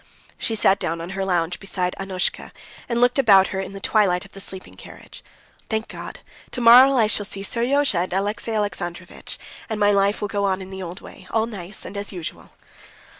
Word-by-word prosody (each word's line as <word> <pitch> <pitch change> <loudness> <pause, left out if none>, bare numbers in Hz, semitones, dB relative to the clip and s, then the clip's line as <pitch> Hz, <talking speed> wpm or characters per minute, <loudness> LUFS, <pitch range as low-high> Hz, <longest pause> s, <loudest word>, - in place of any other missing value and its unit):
She 225 - +1
sat 200 -2 +4
down 165 +1 -2
on 170 +3 -6
her 195 0 -3
lounge 175 -2 0
beside 180 -2 -2
Annushka, 190 -2 -2 0.4
and 235 0 0
looked 245 +2 +3
about 195 -7 +6
her 190 - -3
in 195 +1 -5
the 195 - -7
twilight 195 -3 +2
of 195 - -16
the 195 - -11
sleeping 190 -1 -5
carriage. - - -13 0.5
"Thank 220 0 -1
God! - - -8 0.3
tomorrow 250 +3 +7
I 225 - +5
shall 210 -1 +1
see 195 -1 -3
Seryozha 245 0 +1
and 180 +1 -2
Alexey 205 +4 -2
Alexandrovitch, 180 -4 -4 0.3
and 220 -1 -3
my 205 0 +4
life 200 +1 +2
will 210 - -2
go 200 0 -2
on 190 -1 +1
in 190 0 -9
the 190 0 -7
old 180 0 -7
way, 185 - -13
all 220 0 +1
nice 200 -4 -6
and 200 - -8
as 200 0 -3
usual." 175 -4 -7
195 Hz, 200 wpm, -22 LUFS, 185-220 Hz, 0.5 s, tomorrow